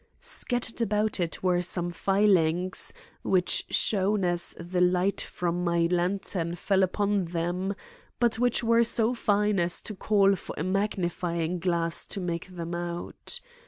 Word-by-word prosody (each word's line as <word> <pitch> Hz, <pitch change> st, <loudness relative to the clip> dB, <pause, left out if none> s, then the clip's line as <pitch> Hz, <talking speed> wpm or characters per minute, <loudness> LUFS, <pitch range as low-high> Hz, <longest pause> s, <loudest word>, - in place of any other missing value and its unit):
Scattered 240 Hz, -1 st, -1 dB
about 210 Hz, -1 st, +1 dB
it 170 Hz, 0 st, -3 dB
were 180 Hz, -1 st, +2 dB
some 175 Hz, 0 st, -1 dB
filings 185 Hz, -2 st, +2 dB, 0.3 s
which 185 Hz, -2 st, +1 dB
shone 200 Hz, -1 st, +2 dB
as 175 Hz, -1 st, 0 dB
the 175 Hz, +1 st, -2 dB
light 180 Hz, +2 st, +2 dB
from 175 Hz, 0 st, -2 dB
my 170 Hz, -1 st, +2 dB
lantern 180 Hz, -1 st, -1 dB
fell 190 Hz, +2 st, +1 dB
upon 200 Hz, +1 st, +1 dB
them, 175 Hz, +3 st, -2 dB, 0.4 s
but 235 Hz, -2 st, +2 dB
which 245 Hz, -1 st, +2 dB
were 230 Hz, 0 st, +4 dB
so 230 Hz, +1 st, +2 dB
fine 210 Hz, -3 st, +1 dB
as 170 Hz, 0 st, +1 dB
to 215 Hz, -, -5 dB
call 200 Hz, -1 st, +3 dB
for -, -, -8 dB
a -, -, -2 dB
magnifying 180 Hz, -3 st, -1 dB
glass 170 Hz, -1 st, 0 dB
to 200 Hz, -, -4 dB
make 170 Hz, -2 st, -3 dB
them 175 Hz, -2 st, -6 dB
out. 175 Hz, -, -5 dB
185 Hz, 145 wpm, -27 LUFS, 175-205 Hz, 0.4 s, were